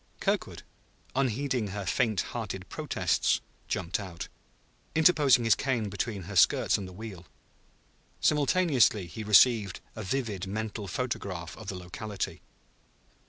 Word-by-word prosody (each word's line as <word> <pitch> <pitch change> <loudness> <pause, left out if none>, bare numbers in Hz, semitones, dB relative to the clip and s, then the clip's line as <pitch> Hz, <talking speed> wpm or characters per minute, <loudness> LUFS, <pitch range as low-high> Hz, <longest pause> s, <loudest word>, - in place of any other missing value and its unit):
Kirkwood, - - -1 0.5
unheeding 130 -2 0
her 100 0 -5
faint 110 +1 +1
hearted - - -5
protests, - - +1 0.3
jumped 90 +3 -1
out, 90 -4 -7 0.7
interposing 150 -6 +5
his 115 - +5
cane 120 -6 -1
between 100 0 -3
her 100 +3 -7
skirts 90 - +4
and 100 - -3
the - - -10
wheel. 95 -3 -9 0.9
Simultaneously 145 - +3
he 85 +6 -7
received 105 -1 +5 0.2
a 110 - -5
vivid 105 -3 -2
mental 105 0 -4
photograph 95 -6 -4
of 110 - -11
the 100 - -3
locality. 95 +3 -5
105 Hz, 120 wpm, -29 LUFS, 95-125 Hz, 0.9 s, interposing